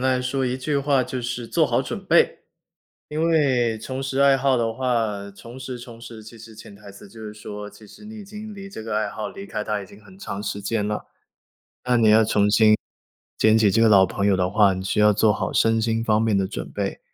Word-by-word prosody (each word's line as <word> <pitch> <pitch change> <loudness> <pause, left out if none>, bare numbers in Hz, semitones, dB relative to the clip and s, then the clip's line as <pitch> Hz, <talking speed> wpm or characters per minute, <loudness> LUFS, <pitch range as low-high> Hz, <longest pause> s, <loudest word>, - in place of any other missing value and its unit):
来 125 - -1
说 130 +1 -1
一 125 +1 -2
句 140 +2 -1
话 140 -2 +2
就 130 0 -5
是 120 -1 -4
做 - - +2
好 - - +1
准 - - -6
备。 - - +3 0.7
因 155 +1 -3
为 125 -8 +2
重 130 +4 -5
拾 135 0 -3
爱 140 -1 +5
好 135 -1 +2
的 115 -1 0
话， 110 -6 -2
重 115 +5 -13
拾 125 -1 -7
重 120 -1 -12
拾， 115 -2 -11
其 115 +2 -12
实 110 0 -13
潜 105 -2 -12
台 100 0 -13
词 100 0 -14
就 110 - -14
是 105 - -7
说， 105 -1 -8
其 110 - -16
实 210 - -15
你 220 +1 -10
已 210 - -9
经 210 +2 -9
离 195 -1 -9
这 195 - -9
个 110 -1 -3
爱 110 -1 0
好 105 -1 -5
离 195 - -10
开 105 - -4
它 105 -1 -2
已 95 - -9
经 100 +3 -16
很 95 -2 -17
长 100 +1 -6
时 100 0 -4
间 105 +1 -2
了。 105 - -4 0.8
那 125 -1 +2
你 110 -2 +4
要 110 +1 +5
重 105 -1 +2
新 110 -1 +5 0.6
捡 110 0 +4
起 105 -3 +3
这 115 +3 +2
个 115 - +5
老 100 -3 +6
朋 100 +2 -3
友 100 -2 +3
的 90 0 0
话， 100 -1 +4
你 95 0 -5
需 100 - -1
要 105 0 +5
做 105 +1 +3
好 - - -3
身 115 0 +2
心 115 0 0
方 110 -1 +2
面 110 -3 +1
的 95 - +1
准 - - -6
备。 - - -4
110 Hz, 270 characters per minute, -23 LUFS, 105-130 Hz, 0.8 s, 老